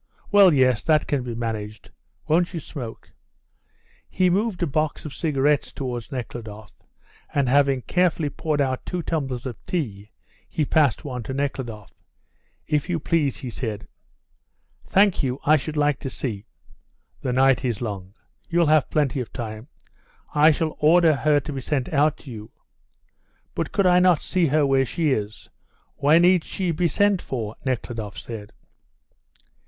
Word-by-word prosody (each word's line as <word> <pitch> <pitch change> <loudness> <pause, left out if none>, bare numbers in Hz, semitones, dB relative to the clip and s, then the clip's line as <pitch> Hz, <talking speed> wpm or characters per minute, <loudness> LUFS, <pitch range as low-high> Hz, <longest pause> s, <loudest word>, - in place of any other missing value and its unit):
Well, 200 -3 +7
yes, 130 -5 +3
that 155 -2 +3
can 140 -3 -1
be 120 -2 -5
managed. 110 -3 -5 0.4
Won't 175 +3 +2
you - - -2
smoke?" 125 -6 -8 1.0
He 185 -1 +2
moved 200 -1 0
a - - +3
box 155 +1 -2
of 150 - -6
cigarettes 145 0 +1
towards 125 -4 -5
Nekhludoff, 110 -5 -7 0.6
and, 140 -2 +1
having 135 -1 +3
carefully 170 -5 +1
poured 150 -2 -1
out 130 -2 -1
two 180 -2 -4
tumblers 135 -7 -3
of 125 -4 -7
tea, 105 - -3 0.4
he 155 - -1
passed 150 -1 +2
one 125 -3 -4
to 130 +3 -5
Nekhludoff. 130 -7 -4 0.7
"If 150 +3 -1
you 170 -2 0
please," 155 -6 0
he 125 - -6
said. 110 -4 -5 1.0
"Thank 195 -1 +3
you; 130 0 -2
I 155 - +6
should 155 +1 -3
like 145 -2 +2
to 135 - -5
see 110 -6 -5 0.3
" - - -40
"The 125 - -1
night 130 +1 +3
is 120 -5 -1
long. 100 -4 -6 0.3
You'll 170 0 +3
have 155 -1 +3
plenty 145 -3 0
of 125 - -5
time. 110 0 -6 0.7
I 150 +1 +6
shall 155 0 -1
order 160 0 +5
her 150 +1 +3
to 150 +1 -6
be 135 - -4
sent 135 +1 -2
out 150 +1 +3
to 135 - -10
you." 110 -1 -9 1.0
"But - - -3
could 200 - +1
I 180 0 +5
not 180 -3 +4
see 180 -3 +1
her 150 +1 +3
where 135 -1 +3
she 155 +3 0
is? 105 -6 -3 0.5
Why 145 +3 +4
need 175 0 +4
she 185 -3 -2
be 170 +2 +1
sent 200 +4 +2
for?" 115 -4 -4
Nekhludoff 115 -5 -3
said. 110 -3 -8
140 Hz, 160 wpm, -23 LUFS, 120-160 Hz, 1.0 s, Well